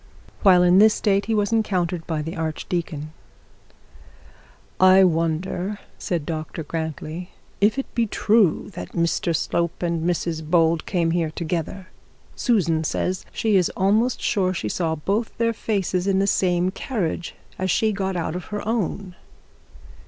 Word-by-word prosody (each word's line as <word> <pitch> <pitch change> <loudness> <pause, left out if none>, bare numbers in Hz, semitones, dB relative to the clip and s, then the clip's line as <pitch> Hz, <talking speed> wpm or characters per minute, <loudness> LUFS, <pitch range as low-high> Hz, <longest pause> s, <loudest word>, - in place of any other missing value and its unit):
While 185 -3 +6
in 180 +1 +5
this 215 +1 +6
state 200 -1 +1
he 225 - +1
was 205 +1 +1
encountered 180 -6 0
by 155 -2 -2
the 165 +4 -5
archdeacon. 160 -1 -3 1.7
'I 185 +1 +7
wonder,' 175 +3 0 0.2
said 170 -5 -2
Dr 160 0 -4
Grantly, 160 +2 -5 0.3
'if 210 +5 +3
it 270 - -1
be 235 -1 +1
true 210 -3 +2
that - - -8
Mr 170 0 0
Slope 170 +3 -1
and 170 -2 -1
Mrs 170 -2 -1
Bold 165 0 +2
come 170 -3 +1
here 165 -2 0
together. 170 +4 -4 0.5
Susan 170 - +1
says 185 +3 -2
she 220 -2 +1
is 180 -3 +3
almost 215 +6 +2
sure 190 -5 0
she 110 -10 -3
saw 160 - -1 0.4
their 230 0 +1
faces 195 -4 -1
in 195 -1 +2
the 195 - +2
same 180 -2 +1
carriage 185 -8 -3 0.2
as 185 0 -1
she 220 +4 +2
got 190 -2 -2
out 170 -1 -2
of 180 - -5
her 210 0 -5
own.' 200 -4 -2
180 Hz, 145 wpm, -23 LUFS, 165-200 Hz, 1.7 s, I